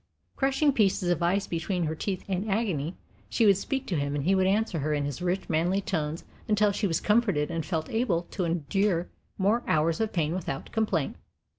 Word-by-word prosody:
Crushing 275 +2 +2
pieces 195 -6 +2
of 175 -1 0
ice 190 +4 +2
between 175 +2 -2
her 160 -1 -1
teeth 185 +4 -4
in 195 +2 -2
agony, 190 -7 -1 0.3
she 230 - +2
would 200 -2 +7
speak 270 +6 -2
to 180 - -2
him 140 0 -1
and 145 - -1
he 185 +6 +3
would 190 -1 +3
answer 200 -3 +1
her 150 +1 0
in 145 -1 -1
his 145 +1 -4
rich, 180 +2 -1
manly 170 +4 +1
tones 160 -5 -2 0.2
until 210 -1 +3
she 200 +1 0
was 165 -2 0
comforted 205 -9 +2
and 165 -2 -3
felt 160 -4 -1
able 220 -7 +1
to 190 - -2
endure 175 +2 0 0.3
more 210 +5 +2
hours 160 +4 +2
of 220 -1 0
pain 165 -5 0
without 160 -7 -4
complaint. 205 -10 0
185 Hz, 200 wpm, -28 LUFS, 160-205 Hz, 0.3 s, would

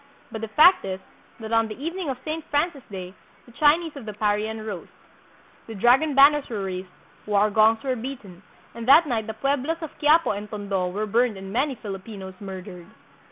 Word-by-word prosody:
But 220 - -6
the 225 - -3
fact 315 - +6
is, 190 -1 -4 0.4
that 220 -1 -7
on 225 0 +3
the 215 +3 -9
evening 335 +2 -4
of 260 - -3
Saint 315 +1 -3
Francis 290 0 0
day 185 -2 -7 0.3
the 240 - -17
Chinese 305 +5 +2
of 275 -5 -9
the 210 - -6
Parian 215 +1 -1
rose. 200 -5 -6 0.8
The 225 - -7
dragon 260 +8 +3
banners 285 +1 +6
were 210 -4 -3
raised, 185 -1 -5 0.4
war 210 0 +2
gongs 220 +3 +4
were 260 -2 -1
beaten, 225 -7 -8 0.3
and 235 0 -7
that 295 +5 +7
night 230 -6 -2
the 220 - -5
pueblos 280 +5 -1
of 320 - -7
Quiapo 310 +3 +4
and 205 +1 -5
Tondo 200 -3 -2
were 205 +4 -3
burned 230 0 +1
and 190 0 -8
many 270 +3 0
Filipinos 195 -2 -8
murdered. 185 -3 -9
225 Hz, 190 wpm, -24 LUFS, 200-280 Hz, 0.8 s, that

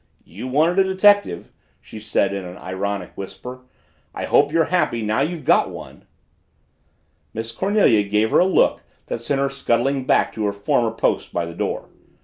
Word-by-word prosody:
"You 110 +8 -8
wanted 160 +8 +2
a - - +6
detective!" 200 - +3 0.3
she 110 - -11
said 105 -2 0
in 100 -1 -4
an 90 0 -9
ironic 95 0 -4
whisper. 125 +6 -9 0.5
"I - - -3
hope 145 0 +3
you're 165 0 +3
happy 120 -10 +1
now 110 +5 0
you've 160 +2 -3
got - - +3
one!" - - -11 1.3
Miss 115 +1 -4
Cornelia 190 - +3
gave 105 +2 +1
her - - +4
a 180 - +5
look 190 - +2 0.2
that 115 - -5
sent 135 +3 -1
her 140 - +1
scuttling 135 0 0
back - - +2
to 110 - -3
her 100 - -1
former 100 +3 0
post 115 - -1
by 85 - -2
the 85 - -8
door. - - -3
115 Hz, 175 wpm, -21 LUFS, 100-145 Hz, 1.3 s, a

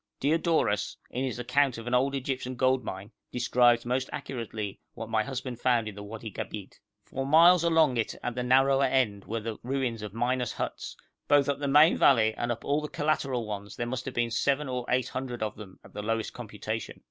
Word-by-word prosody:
Diodorus, 155 - +1
in 125 - -2
his 130 -3 -2
account 125 +1 +1
of 115 - -8
an 120 - -3
old 135 +2 +2
Egyptian 130 -1 -3
gold 130 0 +2
mine, 95 +4 -7 0.2
describes 120 -1 +3
most 125 +2 -1
accurately 110 -5 -5 0.2
what 115 0 -6
my 110 - +3
husband 130 -2 -5
found 120 -3 +2
in 105 - -5
the 100 - -9
Wadi 110 +1 -7
Gabeit. 100 -1 -7 0.3
For 135 - -4
miles 165 +5 +6
along 160 -6 +3
it 115 - -1
at 125 - -2
the 125 - -3
narrower 135 +2 +4
end 125 -7 +1
were 115 +1 -3
the 110 0 -5
ruins 125 -3 -2
of 105 -2 -6
miners' 125 +2 -1
huts; - - -5 0.3
both 145 -1 +4
up 140 0 0
the 145 - -2
main 150 +4 +6
valley 110 -5 +5
and 120 +2 -2
up 115 - -5
all 145 +2 +1
the 150 - -4
collateral 135 -5 -1
ones 100 -1 -6
there 120 - -3
must 130 +1 -4
have 130 - -6
been 120 -1 0
seven 140 +4 +1
or 125 -1 -3
eight 125 0 +1
hundred 125 -3 -4
of 105 -1 -3
them 100 -3 -12
at - - -16
the 105 - -5
lowest 115 +1 -2
computation. - - -6
125 Hz, 210 wpm, -28 LUFS, 115-135 Hz, 0.3 s, miles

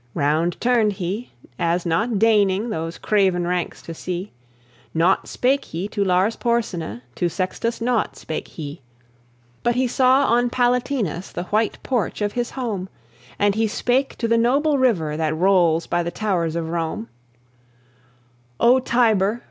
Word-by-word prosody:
Round 160 +3 +1
turned 235 -4 +2
he, 195 +5 -4 0.3
as 170 +1 0
not 210 +7 +1
deigning 210 0 +3
Those 165 -3 -4
craven 190 -4 +1
ranks 180 -1 -2
to 165 - -7
see; 180 +4 -5 0.6
Naught 170 +4 +2
spake 270 +2 +1
he 175 +5 -4
to 205 -2 -1
Lars 190 +3 +2
Porsena, 180 - -2
To 175 - 0
Sextus 190 +6 -2
naught 235 -1 0
spake 155 - -5
he; 145 -1 -8 0.8
But 240 0 +1
he 255 +1 +2
saw 260 +3 +4
on 240 +1 +2
Palatinus 245 - 0
The 175 - -4
white 215 +1 +1
porch 240 -7 -1
of 205 - -1
his 240 -1 -2
home; 210 -8 -4 0.5
And 205 0 +3
he 220 +2 +1
spake 250 +5 0
to 230 - -1
the 230 0 +3
noble 280 +5 +2
river 175 -13 +1
That 155 -1 -1
rolls 175 -3 +3
by 175 - 0
the 170 - -2
towers 175 -5 -1
of 165 -1 -2
Rome: 170 +6 -3 1.5
"O 250 +2 +5
Tiber! 225 -4 +2
205 Hz, 150 wpm, -22 LUFS, 175-240 Hz, 1.5 s, O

